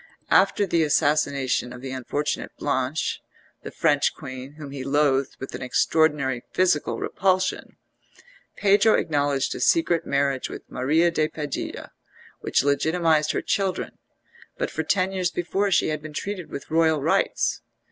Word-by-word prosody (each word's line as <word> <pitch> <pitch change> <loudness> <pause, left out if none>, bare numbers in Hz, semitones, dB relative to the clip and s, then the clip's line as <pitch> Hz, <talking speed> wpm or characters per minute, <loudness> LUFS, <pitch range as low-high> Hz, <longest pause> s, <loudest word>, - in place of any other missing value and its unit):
After 205 - +4
the 170 -3 +1
assassination 145 -4 +1
of 125 0 -9
the 130 0 -6
unfortunate 140 +3 -3
Blanche, 140 +1 -1 0.4
the - - -7
French 145 -3 +1
Queen 130 -1 -8
whom 150 -2 -9
he 135 -2 -6
loathed 140 -1 +1
with 130 - -7
an - - -6
extraordinary 140 -1 +1
physical 180 -5 +2
repulsion, 185 -1 -1 0.8
Pedro 205 +2 +4
acknowledged 145 -3 0
a - - -6
secret 250 - +2
marriage 140 -1 0
with - - -8
Maria 160 +7 +2
de 155 -2 +1
Padilla, 150 -3 -5 0.5
which - - +1
legitimised 155 +2 +2
her - - -2
children; 195 -2 -2 0.6
but - - -2
for 160 - -2
ten 185 +4 +1
years 185 -2 0
before 190 +4 -1
she 185 - +2
had 155 -1 -3
been 155 0 -9
treated 190 +1 -5
with 140 - -8
royal 160 -1 +3
rights. - - +1
150 Hz, 145 wpm, -24 LUFS, 140-170 Hz, 0.8 s, After